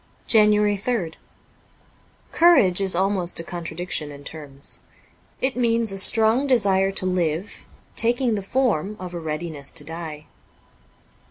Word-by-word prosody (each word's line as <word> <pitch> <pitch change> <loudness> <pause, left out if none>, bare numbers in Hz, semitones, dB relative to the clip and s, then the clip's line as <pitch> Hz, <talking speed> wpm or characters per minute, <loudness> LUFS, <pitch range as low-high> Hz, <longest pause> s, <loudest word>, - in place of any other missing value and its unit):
'' - - -35
JANUARY 210 -1 +4
3rd 195 -6 -2 1.2
COURAGE 215 - +4
is 190 -2 -1
almost 185 -2 0
a - - -5
contradiction 170 -2 -4
in 145 -1 -11
terms. 145 -3 -7 0.6
It 260 0 0
means 230 -3 +1
a 195 - -2
strong 225 +6 +5
desire 195 -6 +3
to 190 - +1
live 180 0 -2 0.3
taking 240 +1 +1
the 205 - -2
form 210 -3 -1
of 180 -1 -7
a 175 - -4
readiness 155 -2 -4
to 155 - -5
die. 155 -1 -8
190 Hz, 135 wpm, -23 LUFS, 165-220 Hz, 1.2 s, strong